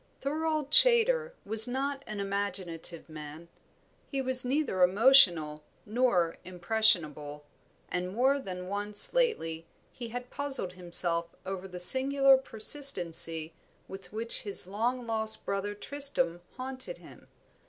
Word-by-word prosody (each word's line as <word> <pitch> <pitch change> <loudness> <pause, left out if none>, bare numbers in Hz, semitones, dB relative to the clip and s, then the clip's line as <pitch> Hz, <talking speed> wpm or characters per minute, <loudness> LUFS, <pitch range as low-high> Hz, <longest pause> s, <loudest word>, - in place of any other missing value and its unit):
Thorold 305 0 -4
Chaytor 485 0 +3
was 220 +2 +7
not 275 +2 -5
an 215 -1 -8
imaginative 190 -4 -5
man; 155 +1 -12 0.6
he 275 - -6
was 260 -1 +4
neither 255 -7 -3
emotional 180 - +3 0.2
nor 210 -7 -1
impressionable, 170 -6 -2 0.4
and 180 +1 -5
more 260 +7 0
than 180 -6 -9
once 205 +1 -1
lately 165 - -3 0.2
he 240 - -10
had 245 +2 -9
puzzled 275 -10 -5
himself 170 -1 +2
over 190 0 -7
the 180 -1 -11
singular 270 +7 +7
persistency 180 - +1 0.3
with 195 0 -13
which 225 +2 0
his 200 -3 +1
long 235 +6 -4
lost 220 -1 -5
brother 200 +1 -5
Tristram 265 -7 -1 0.2
haunted 260 - -7
him. - - -18
210 Hz, 120 wpm, -27 LUFS, 180-265 Hz, 0.6 s, was